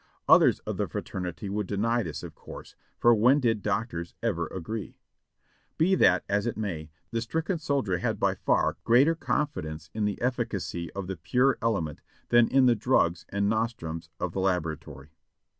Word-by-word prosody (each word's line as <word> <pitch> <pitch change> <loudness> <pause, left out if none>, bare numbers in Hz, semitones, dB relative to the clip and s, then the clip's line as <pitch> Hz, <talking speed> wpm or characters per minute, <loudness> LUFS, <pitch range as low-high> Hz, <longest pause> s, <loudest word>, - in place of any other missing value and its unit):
Others - - +6
of - - -5
the - - 0
fraternity 90 +1 -5
would 100 0 -2
deny 115 +4 +1
this - - -5
of - - -8
course, - - -11 0.2
for 120 - +5
when 125 +6 +5
did 115 -5 +1
doctors 100 -5 -3
ever 85 -8 0
agree? 95 +3 -6 0.8
Be 175 +4 +3
that 90 - +4
as 100 +2 0
it 120 - -3
may, 85 -8 -4 0.2
the 115 -1 -1
stricken 160 - -2
soldier 135 - 0
had - - -1
by - - +2
far - - +1
greater 135 +8 +5
confidence 85 - -3
in 110 -1 -1
the 105 -1 -2
efficacy 115 -9 -2
of 100 -1 -4
the 95 0 -5
pure 125 - +2
element 95 -10 -1 0.3
than 120 -1 +5
in 135 -1 +4
the 125 - +6
drugs 105 -7 +1
and 100 0 0
nostrums 100 -8 -2
of 90 - -2
the 95 - -3
laboratory. 80 -6 -2
105 Hz, 170 wpm, -27 LUFS, 85-120 Hz, 0.8 s, Others